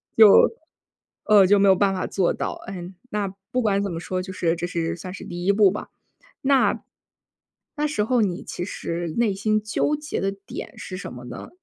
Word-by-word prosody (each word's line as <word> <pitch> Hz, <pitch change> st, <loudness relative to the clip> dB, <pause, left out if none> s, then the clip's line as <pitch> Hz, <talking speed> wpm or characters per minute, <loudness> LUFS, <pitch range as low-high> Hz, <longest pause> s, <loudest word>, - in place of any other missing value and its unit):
就， 220 Hz, -2 st, +9 dB, 1.0 s
呃， 205 Hz, -3 st, +6 dB
就 205 Hz, +1 st, +5 dB
没 200 Hz, 0 st, +4 dB
有 190 Hz, -, +7 dB
办 200 Hz, +1 st, +2 dB
法 185 Hz, -, -2 dB
做 190 Hz, -3 st, +1 dB
到， -, -, -4 dB
嗯， 185 Hz, -1 st, -7 dB, 0.2 s
那 205 Hz, -1 st, -1 dB, 0.2 s
不 255 Hz, -1 st, 0 dB
管 200 Hz, -2 st, +2 dB
怎 200 Hz, -2 st, -2 dB
么 165 Hz, -, -4 dB
说， 185 Hz, +1 st, -3 dB
就 190 Hz, +1 st, -7 dB
是 170 Hz, -2 st, 0 dB
这 175 Hz, +1 st, -3 dB
是 170 Hz, -2 st, -2 dB
算 180 Hz, +2 st, -8 dB
是 -, -, -9 dB
第 175 Hz, 0 st, -6 dB
一 200 Hz, -, +5 dB
步 200 Hz, -2 st, +5 dB
吧。 205 Hz, -, -6 dB, 0.5 s
那 270 Hz, -1 st, +3 dB, 1.0 s
那 300 Hz, 0 st, 0 dB
时 215 Hz, -9 st, 0 dB
候 245 Hz, +1 st, +2 dB
你 185 Hz, -4 st, -1 dB
其 175 Hz, -, -5 dB
实 170 Hz, -3 st, -4 dB
内 225 Hz, -4 st, +2 dB
心 215 Hz, +2 st, 0 dB
纠 255 Hz, +7 st, 0 dB
结 300 Hz, 0 st, -4 dB
的 195 Hz, 0 st, 0 dB
点 -, -, -8 dB
是 185 Hz, -, -7 dB
什 -, -, -7 dB
么 125 Hz, 0 st, -9 dB
呢？ -, -, -8 dB
195 Hz, 220 characters per minute, -24 LUFS, 180-215 Hz, 1.0 s, 就